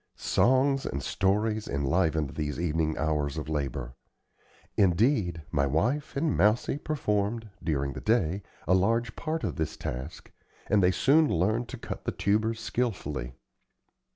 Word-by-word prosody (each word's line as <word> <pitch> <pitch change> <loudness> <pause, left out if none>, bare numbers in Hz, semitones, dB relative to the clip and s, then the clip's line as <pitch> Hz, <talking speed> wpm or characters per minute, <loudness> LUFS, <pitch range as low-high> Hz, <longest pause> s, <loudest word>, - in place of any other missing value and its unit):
Songs 135 +2 +2
and 70 0 -4
stories 105 +6 0
enlivened 75 +1 +1
these 75 -1 -3
evening 80 -2 0
hours 75 -2 0
of 75 - -4
labor. 70 -5 -3 0.8
Indeed, 95 - +2
my 70 0 +2
wife 120 - 0
and 155 +1 +1
Mousie 105 +8 +2
performed, 110 -6 -1
during 70 -4 -1
the - - -7
day, 100 -4 +1 0.3
a 90 - +4
large 115 +5 +2
part 160 0 -3
of - - -2
this 80 -2 -2
task, 65 +5 -6 0.3
and 105 0 +3
they 90 - +5
soon 145 - +4
learned 110 +8 +1
to - - -6
cut - - -7
the - - 0
tubers 110 +2 0
skilfully. 75 - -3
95 Hz, 140 wpm, -28 LUFS, 75-115 Hz, 0.8 s, they